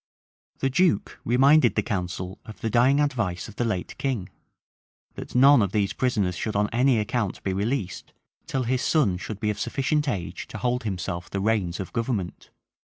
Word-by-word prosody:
The 135 - +2
duke 175 - +1
reminded 135 +6 +4
the - - +1
council 90 -2 -4
of 110 -1 -11
the 110 - -1
dying 130 +5 +4
advice 110 - -1
of 105 - -13
the - - +1
late 110 -6 -2
king, 125 -10 -2 0.8
that - - -9
none 135 0 +7
of 100 -2 0
these 100 -2 +1
prisoners 105 -8 0
should 110 +4 -3
on 105 0 +1
any 125 +1 +3
account 105 -1 -2
be 95 - -1
released, 100 - -2 0.4
till 135 -1 -1
his 125 +1 0
son 125 - +2
should 100 +3 -6
be 105 0 0
of 105 - -6
sufficient 145 +1 0
age 95 -9 -4
to - - -7
hold 125 -1 -1
himself 90 -3 -4
the 100 - -3
reins 95 -4 0
of 95 - -6
government. 115 -6 -3
110 Hz, 180 wpm, -25 LUFS, 95-130 Hz, 0.8 s, none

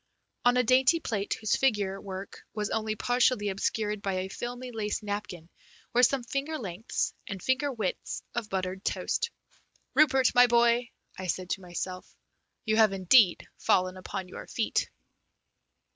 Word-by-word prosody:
On 245 0 +5
a 250 - +4
dainty 255 +7 +4
plate 210 -9 -2
whose 215 -1 0
figure 205 -7 +1
work 195 0 -7
was 210 -1 -2
only 215 -1 -1
partially 245 -2 +2
obscured 210 +1 -1
by 195 -1 -1
a 185 +1 -2
filmy 245 +4 -6
lace 215 -1 -3
napkin 205 -5 -5 0.5
were 245 - +4
some 255 0 +3
finger 280 +6 -3
lengths 195 - -3
and 195 - -5
finger 260 +7 0
widths 215 -7 -3
of 230 -3 -3
buttered 190 0 -3
toast. 470 - -1 0.6
"Rupert, 270 -4 +4
my 245 0 +7
boy," 235 0 +3 0.3
I 185 - -4
said 180 +1 -2
to - - -1
myself, 180 +1 -6 0.5
"you 220 -1 +2
have 215 -3 +5
indeed 190 0 +4
fallen 185 0 +2
upon 185 0 -6
your - - -9
feet!" - - -1
215 Hz, 150 wpm, -29 LUFS, 190-245 Hz, 0.6 s, my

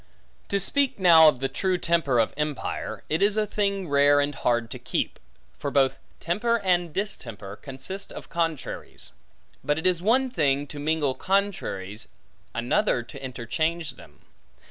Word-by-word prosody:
To 200 - +1
speak 275 +7 +2
now 170 -4 +8
of 135 -4 +3
the 135 - +1
true 185 +5 0
temper 165 -8 +1
of 115 -1 +2
empire, 150 -1 -3
it 155 +3 0
is 205 +1 +3
a 215 - +2
thing 200 -2 -1
rare 145 0 +5
and 145 0 0
hard 120 -3 0
to - - -6
keep; - - -2 0.4
for 145 - -2
both 135 -1 +2 0.2
temper, 225 +8 +1
and 175 -3 +1
distemper, 115 - -5
consist 140 - -8
of - - -9
contraries. 165 -4 -4 0.5
But 150 0 +1
it 160 - -4
is 180 -2 +3
one 250 +6 +2
thing, 145 - +1
to 145 - -7
mingle 150 -2 +1
contraries, 130 - -2 0.5
another 120 - +1
to 135 +3 -11
interchange 150 +6 -2
them. - - -17
155 Hz, 155 wpm, -26 LUFS, 135-190 Hz, 0.5 s, now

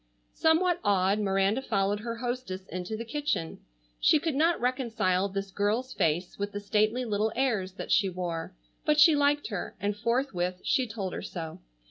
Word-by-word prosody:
Somewhat 350 +2 +3
awed, 200 0 +2
Miranda 195 +3 +1
followed 205 -4 0
her 230 +2 -4
hostess 240 -6 -4
into 185 +4 -4
the 230 - -5
kitchen. 280 - -2 0.4
She - - +5
could 315 +1 -1
not 325 +5 +2
reconcile 225 -7 0
this 195 0 -4
girl's 220 +7 0
face 170 +5 0
with 205 0 -3
the 205 - -3
stately 215 +4 +1
little 215 0 0
airs 220 -8 0
that - - -6
she 195 -2 +4
wore, 175 -1 -4 0.3
but 300 -1 +2
she 300 +1 +8
liked 290 0 +2
her 205 -5 -4
and 205 +1 -1
forthwith 210 -6 -1
she 260 -4 +1
told 200 -4 -4
her - - -4
so. 165 -3 -6
210 Hz, 170 wpm, -28 LUFS, 190-255 Hz, 0.4 s, she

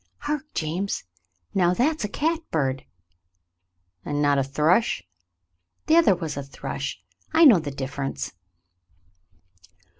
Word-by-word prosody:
"Hark, 295 0 -2
James. 175 +5 -2 0.5
Now, 180 -2 +3
that's 300 - +1
a - - 0
catbird!" 180 - -1 1.2
"And 145 0 -2
not 145 -1 +3
a - - +2
thrush 155 - +2 0.4
?" 90 +1 -51
"The 315 - +4
other 330 - +6
was 165 -3 -4
a 140 - -3
thrush. 140 -2 -5 0.3
I 330 - +7
know 230 - +8
the 150 -2 -4
difference." 135 0 -4
160 Hz, 120 wpm, -25 LUFS, -, 1.2 s, know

